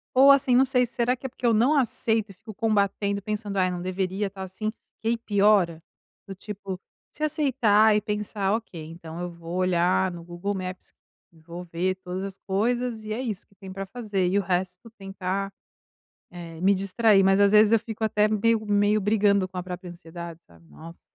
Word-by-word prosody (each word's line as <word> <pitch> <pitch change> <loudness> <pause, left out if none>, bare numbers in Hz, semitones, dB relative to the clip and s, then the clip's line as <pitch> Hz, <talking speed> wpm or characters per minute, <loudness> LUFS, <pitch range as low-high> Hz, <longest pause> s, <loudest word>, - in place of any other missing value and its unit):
ou, 275 +2 +8
assim, 260 -3 +4
não 265 +2 +6
sei, 250 -1 +2
será 245 +1 0
que 265 +2 -6
é - - -10
porque 245 - -7
eu 230 - +4
não 245 +8 +3
aceito 225 -4 0
e - - -13
fico 220 +3 -12
combatendo, 200 -1 0
pensando: 210 -1 -4
"Ai, 185 -1 +3
não 180 -1 -4
deveria 190 +2 -2
estar 195 0 -10
assim." 190 +3 -4 0.3
Que 225 - -2
aí 235 - +1
piora. 200 -6 +2 0.5
Do 195 - -6
tipo, 195 -1 -7 0.3
se 305 - -14
aceitar 235 -9 +3
e 210 - +2
pensar: 210 -1 -2
"Ok, 190 -8 -4
então 165 +1 -9
eu 180 - -3
vou 170 +1 -7
olhar 185 0 +2
no 170 -1 -9
Google 175 +4 -4
Maps 185 -1 -6 0.4
e 165 - -22
vou 170 +2 -9
ver 180 +2 -1
todas 185 +1 -4
as 195 -1 -6
coisas. 225 +3 -1
E 215 - -3
é 235 - -3
isso 220 -7 -4
que - - -29
tem 190 -1 -11
para 195 +1 -5
fazer." 205 -4 -2
E 195 +3 +2
o - - +1
resto, 180 +3 -3
tentar, 195 0 -4 0.8
eh, 165 -2 -9
me 195 +2 +4
distrair. 195 +2 +3
Mas, 195 0 +4
às 200 0 +4
vezes, 215 0 +6
eu 230 - +6
fico 220 0 -8
até 210 -1 +3
meio 215 +1 +1
meio 205 +1 +2
brigando 200 -1 +2
com 185 - -12
a - - -2
própria 180 0 -7
ansiedade, 170 -1 -9
sabe: 85 0 -21
"Nossa, 165 +1 -13
200 Hz, 205 wpm, -25 LUFS, 180-220 Hz, 0.8 s, ou